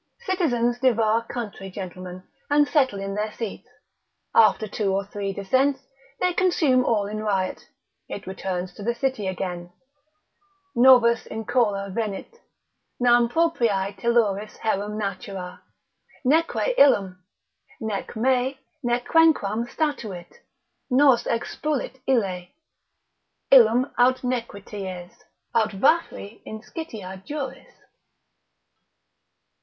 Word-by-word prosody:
Citizens 245 - +1
devour 230 -3 +3
country 205 -5 -6
gentlemen, 185 -1 -8 0.3
and 290 0 +4
settle 260 -10 +2
in 195 0 -4
their 210 +1 -2
seats; 225 -3 -7 0.6
after 220 -1 +4
two 200 -1 -1
or 195 +1 -1
three 200 -1 -4
descents, 260 +8 +1 0.4
they 360 0 +1
consume 320 -8 +3
all 215 -4 +1
in 210 +1 -4
riot, 195 -3 -2 0.4
it 200 - -6
returns 185 -1 -4
to - - -12
the 235 +3 -1
city 250 -5 -1
again. 180 -2 -4 1.0
———Novus 240 -2 +5
incola 210 -3 -1
venit; 220 - -4 0.6
Nam 240 -1 +4
propriae 235 -11 +1
telluris 215 -2 0
herum 210 -1 -2
natura, 195 -3 -5 0.6
neque 330 - +2
illum. 195 -9 +4 0.6
Nec 220 -3 -4
me, 260 +3 +1 0.2
nec 240 -1 0
quenquam 240 - +3
statuit; 230 - -3 0.6
nos 265 -1 +4
expulit 265 +3 -2
ille: 190 -8 0 1.0
Illum 250 0 +6
aut 255 +1 +3
nequities, 200 -7 -5 0.4
aut 225 -2 +2
vafri 225 - 0
inscitia 215 - -8
juris. 270 0 -6
225 Hz, 100 wpm, -24 LUFS, 195-260 Hz, 1.0 s, Illum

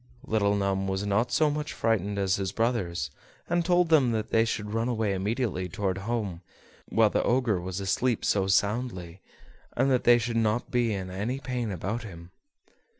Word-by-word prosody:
Little 100 -2 +1
Thumb 95 -1 0
was 95 +1 -2
not 105 +4 +1
so 155 -2 +3
much 150 0 -3
frightened 105 -3 0
as 95 -1 +1
his 95 -1 -2
brothers, 95 - -1 0.4
and 175 0 +1
told 175 0 +3
them 140 -7 +4
that 110 -1 -3
they 115 0 +4
should 105 -2 -3
run 115 +1 0
away 110 -4 0
immediately 100 -1 -2
toward 95 0 -2
home 100 -5 -3 0.5
while 110 -2 +3
the - - +1
Ogre 120 -7 +1
was 90 +1 -4
asleep 110 +5 0
so 95 -2 +2
soundly, 95 -3 -1 0.6
and 135 +2 +3
that 125 - +2
they 120 0 +7
should 120 0 -2
not 110 +1 0
be 120 -2 +1
in 95 -3 -4
any 110 +8 -3
pain 125 -5 -3
about 100 +6 -3
him. 85 -5 -10
105 Hz, 180 wpm, -27 LUFS, 95-120 Hz, 0.6 s, they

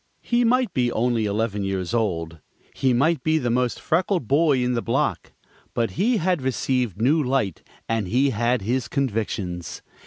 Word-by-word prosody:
He 240 0 +2
might 245 -3 +2
be 125 -2 +1
only 115 -1 +1
eleven 105 0 -1
years 95 +1 -2
old, 85 -8 -1 0.3
he 130 - +1
might 150 +7 +2
be 160 0 +2
the 125 -6 -1
most 125 0 0
freckled 175 - 0
boy 140 -2 +3
in 125 0 0
the 120 - 0
block, 115 - -1 0.4
but 115 -1 0
he 225 +6 +1
had 180 -3 0
received 125 -4 -1
new 145 +8 +3
light, 125 - -1 0.3
and 115 -4 -1
he 130 +7 +2
had 120 0 0
his 120 +3 -1
convictions. 105 -9 -3
125 Hz, 165 wpm, -23 LUFS, 110-140 Hz, 0.4 s, boy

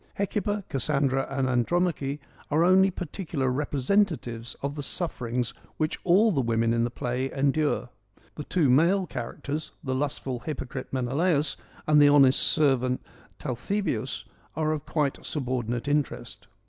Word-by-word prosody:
Hecuba, 205 0 -1
Cassandra 135 0 +1
and 135 -1 0
Andromache 140 +3 0 0.3
are 155 +3 +3
only 190 +2 +6
particular 165 -6 -3
representatives 135 - 0
of 140 0 -1
the 145 - -5
sufferings 125 -6 -2 0.2
which 155 0 -1
all 200 +6 +5
the 140 -7 +1
women 115 -1 +1
in 115 0 +2
the 120 - 0
play 125 +1 -2
endure. 140 -2 +1 0.4
The 150 - -6
two 170 -6 +2
male 170 +9 +4
characters, 145 +3 -5
the 130 -3 -2
lustful 135 -2 -2
hypocrite 135 -2 -5
Menelaus 140 +3 +1 0.3
and 150 -1 +5
the 145 - +7
honest 140 -2 +6
servant 130 -4 +2 0.3
Talthybius 150 - -2 0.3
are 155 -1 0
of 155 -1 -3
quite 145 -4 0
subordin 125 -5 -2
ate 120 +4 -5
interest. 145 -2 -2
140 Hz, 135 wpm, -27 LUFS, 130-160 Hz, 0.4 s, the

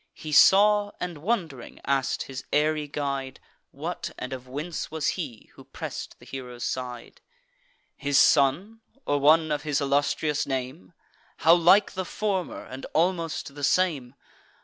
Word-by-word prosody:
He 155 - -8
saw, 205 +5 +6
and, 175 -4 -5
wond'ring, 165 - -3
ask'd 135 -1 0
his 135 0 -8
airy 150 0 +1
guide, 140 -2 -4 0.3
What - - -5
and 130 +1 -5
of 130 -1 -8
whence 150 +6 -5
was 155 -1 -1
he, 125 - -6
who - - -14
press'd - - -7
the - - -17
hero's 125 -2 -8
side: 125 -2 -5 0.7
"His 140 -1 0
son, 165 +13 +3 0.2
or 145 0 +1
one 155 +2 +4
of 145 -1 0
his 145 -2 -1
illustrious 145 +1 0
name? 130 -9 -5 0.4
How 160 +3 +6
like 180 +4 +5
the 190 - -3
former, 195 -1 -3
and 130 +1 -8
almost 165 -3 0
the 145 0 -9
same! 145 -5 +1
145 Hz, 145 wpm, -26 LUFS, 135-170 Hz, 0.7 s, saw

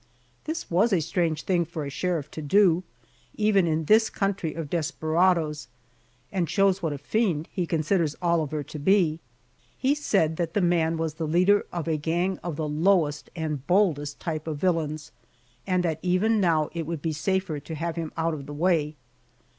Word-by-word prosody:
This 315 - -4
was 195 +7 +3
a 190 - +3
strange 165 -1 -1
thing 180 -2 +1
for 160 -2 -5
a 140 - -5
sheriff 160 -1 -2
to 155 - -6
do, 180 +2 +4 0.5
even 210 -4 +3
in 160 0 0
this 220 +5 +5
country 195 -5 -2
of 165 -2 -4
desperadoes, 160 -1 0 0.6
and 180 -5 -1
shows 195 +1 +2
what 165 -3 -1
a 145 - -3
fiend 170 - 0
he 180 -3 -2
considers 160 -1 0
Oliver 160 -4 0
to 150 +2 -8
be. 165 -1 +3 0.6
He 270 +2 +2
said 195 - +1
that 170 -2 -2
the - - +3
man 170 -3 +2
was 160 -1 -2
the 160 0 -4
leader 185 +6 +3
of 170 -2 -4
a 160 -2 +1
gang 175 +5 -1
of 170 -3 -5
the 155 0 -2
lowest 150 -1 +1
and 150 -5 -4
boldest 160 -7 +1
type 155 -1 -4
of 155 -2 -3
villains, 155 -3 -1 0.6
and 180 -1 +1
that 160 -3 -1
even 205 +5 +2
now 160 -4 +2
it 165 -2 -4
would 165 -3 -4
be 160 -1 -1
safer 185 -1 -1
to 160 +3 -7
have 165 +2 -3
him 165 -2 -4
out 165 0 0
of 140 -3 -7
the 145 - -7
way. 155 -1 +1
165 Hz, 185 wpm, -26 LUFS, 155-185 Hz, 0.6 s, this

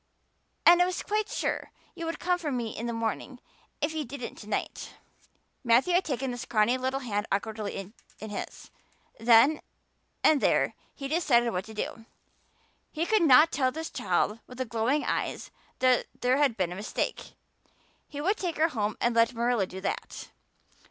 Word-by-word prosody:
And 345 +1 +8
I - - +6
was 365 - -3
quite 425 0 -1
sure - - -2 0.2
you 335 - -6
would 330 - -3
come 360 0 0
for 310 -4 -3
me 240 -4 -3
in 235 - -4
the - - -2
morning, 230 +3 -3 0.4
if 300 +1 0
you 315 -1 -2
didn't 255 -1 -7
to 210 - -11
night." - - -4 0.7
Matthew 250 +9 +4
had 360 +2 +3
taken 265 -3 -2
the 245 - -6
scrawny 235 -1 +2
little 260 +1 -2
hand 210 -4 -2
awkwardly 205 -1 -3 0.3
in 215 - -7
his; 205 - -7 0.5
then 235 +7 +5 0.6
and 300 -3 +5
there - - +2 0.2
he 275 - -5
decided 260 -7 +2
what 180 0 -3
to 220 - -11
do. 225 +1 -5 0.9
He 325 +2 -1
could 435 +1 +3
not 310 +1 +7
tell 260 -2 +1
this 320 +3 -6
child 215 -2 0
with 250 - -12
the 260 - -2
glowing 230 +6 0
eyes - - -2 0.3
that 255 -1 +3
there 250 +2 +2
had 280 -6 +2
been 180 -3 0
a - - -5
mistake; 205 +3 -4 0.7
he 290 - -8
would 385 +8 +1
take 350 -4 -3
her 320 +2 +3
home 215 -6 -2
and 240 -1 +1
let 230 +1 +3
Marilla 235 -4 +1
do 190 +1 -8
that. - - -4
250 Hz, 180 wpm, -28 LUFS, 225-305 Hz, 0.9 s, And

